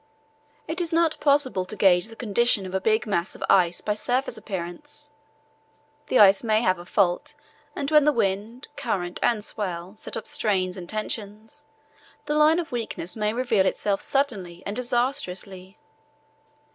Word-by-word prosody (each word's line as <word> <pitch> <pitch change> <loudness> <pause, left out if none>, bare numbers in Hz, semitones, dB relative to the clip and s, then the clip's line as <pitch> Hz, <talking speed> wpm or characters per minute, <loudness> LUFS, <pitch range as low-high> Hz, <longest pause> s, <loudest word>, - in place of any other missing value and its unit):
It 335 +3 -2
is 340 - -1
not 330 -1 +2
possible 280 -9 +2
to 185 +4 -8
gauge 185 -1 +4
the 225 - -12
condition 225 -2 +1
of 185 - -7
a 190 - 0
big 220 +2 +2
mass 190 -4 -1
of - - -7
ice 175 -2 +3
by 210 - -1
surface 245 +5 -1
appearance. 220 - -7 1.0
The - - +2
ice 200 -1 +6
may 220 0 +2
have 185 -4 +2
a 175 - -11
fault, 180 -4 0 0.4
and 285 +1 -3
when 300 -1 +6
the 300 - +4
wind, 220 +2 -2
current, 180 -6 -3
and 215 -3 +1
swell 185 -2 -5
set - - -5
up - - -6
strains 205 -11 0
and 180 -3 -9
tensions, 215 +5 -5 0.6
the 300 - -1
line 305 +2 +5
of 345 -2 -3
weakness 225 -7 -3
may 210 -1 0
reveal 225 -5 +1
itself 200 +1 -1
suddenly 195 -12 -2
and 200 - -4
disastrously. 240 -7 -2
215 Hz, 160 wpm, -25 LUFS, 190-260 Hz, 1.0 s, ice